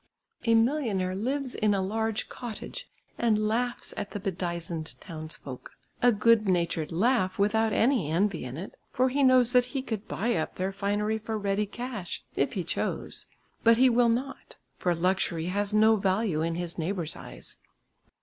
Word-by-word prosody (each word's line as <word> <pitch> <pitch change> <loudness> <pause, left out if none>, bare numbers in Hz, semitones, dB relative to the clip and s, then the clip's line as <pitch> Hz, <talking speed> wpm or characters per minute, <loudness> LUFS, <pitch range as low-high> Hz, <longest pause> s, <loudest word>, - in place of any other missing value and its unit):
A 230 -1 +4
millionaire 225 -7 +1
lives 255 +6 -2
in 210 -1 +2
a 195 - 0
large 220 +2 -1
cottage 245 - -7 0.3
and 215 -2 +2
laughs 240 +3 -1
at 205 - -4
the 205 - -5
bedizened 170 -4 -4
townsfolk, 155 -5 -8 0.3
a 245 - +6
good 215 0 +4
natured 170 -3 0
laugh 190 +1 +2
without 220 +2 +2
any 225 - +2
envy 180 +2 +1
in 125 +2 -6
it, 185 +5 -7 0.2
for 255 +1 +2
he 280 +3 0
knows 255 -2 +5
that 250 -1 +5
he 260 - -1
could 220 -5 -4
buy 235 +3 0
up 160 - -2
their 185 +1 -1
finery 205 +2 -1
for 220 0 -3
ready 205 0 0
cash, 235 -5 -5
if - - +1
he - - -2
chose. - - -3 0.4
But 230 0 +6
he 255 +1 +6
will 240 0 +4
not, 255 +4 -3 0.2
for 175 -1 0
luxury 170 -1 0
has 205 +2 0
no 215 +1 +5
value 190 -4 +1
in 165 +1 -1
his 175 0 -5
neighbours' 170 -1 -2
eyes. - - -10
210 Hz, 170 wpm, -28 LUFS, 180-230 Hz, 0.4 s, a